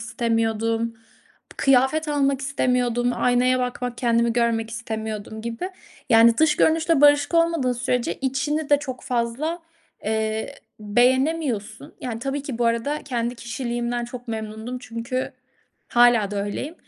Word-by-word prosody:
istemiyordum. 230 -1 -1 0.6
Kıyafet 270 +4 +3
almak 275 -2 +1
istemiyordum, 250 -3 0
aynaya 250 +1 +2
bakmak, 250 -1 -3
kendimi 235 -1 +2
görmek 230 -1 0
istemiyordum 220 -2 -5
gibi. 235 +11 -4 0.4
Yani, 230 0 +6
dış 310 -1 +4
görünüşle 320 -1 +3
barışık 290 +2 +5
olmadığın 335 -6 +2
sürece 245 0 -1
içini 290 +3 -2
de 290 - +6
çok 260 -3 -7
fazla, 250 +8 -2 0.5
eee, 220 0 -2 0.3
beğenemiyorsun. 245 +1 0
Yani, 235 -3 -4
tabii 275 +3 -3
ki 270 -4 -5
bu 240 - +1
arada 235 +6 -1
kendi 240 -3 -2
kişiliğimden 240 0 -3
çok 245 +1 -9
memnundum 220 +2 -5
çünkü 245 +3 -4 0.6
hâlâ 240 -4 +4
da 200 -1 -2
öyleyim, 265 +10 -4
245 Hz, 125 wpm, -23 LUFS, 230-270 Hz, 0.6 s, Yani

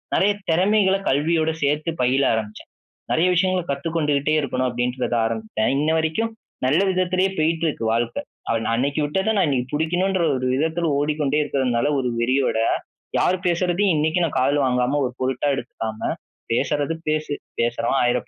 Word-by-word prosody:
நிறையா 205 +1 +3 0.2
திறமைகளை 195 +2 +3
கல்வியோடு 160 +3 +1
சேர்த்து 150 +3 0
பயில 130 +3 +2
ஆரம்பிச்சேன். 110 -1 -5 0.4
நிறைய 165 +3 +3
விஷயங்களை 185 0 +1
கத்துக்கொண்டுகிட்டே 150 0 0
இருக்கணும் 130 -2 -1
அப்படின்றத 125 0 -1
ஆரம்பிச்சுட்டேன். 110 -1 -1
இன்ன 150 +2 +1
வரைக்கும் 160 +9 0 0.3
நல்ல 150 +8 +3
விதத்திலேயே 185 +1 +1
போயிட்டு 165 +1 +1
இருக்கு 145 -7 -3
வாழ்க்கை. 120 0 -1 0.4
நா - - -1
அன்னைக்கு 140 +5 0
விட்டத 190 +8 0
நான் 190 -5 +3
இன்னைக்கு 130 -3 -1
பிடிக்கணுன்ற 175 +5 0
ஒரு 130 0 -2
விதத்தில 160 +4 0
ஓடிக்கொண்டே 150 0 0
இருக்கிறதுனால, 130 -5 0
ஒரு 125 - -1
வெறியோட 130 0 +1 0.6
யார் 185 - +2
பேசுறதையும் 180 +2 +2
இன்னைக்கு 160 +4 +1
நான் 165 - -1
காதுல 140 +2 +2
வாங்காம, 125 +3 +1
ஒரு 125 - -4
பொருட்டா 130 +2 0
எடுத்துக்காம 110 -3 -4 0.4
பேசுறது 145 +5 0
பேசு 155 -1 -1 0.3
பேசுறவன் 120 +2 +1
1000 120 0 0
145 Hz, 145 wpm, -22 LUFS, 130-170 Hz, 0.6 s, நிறையா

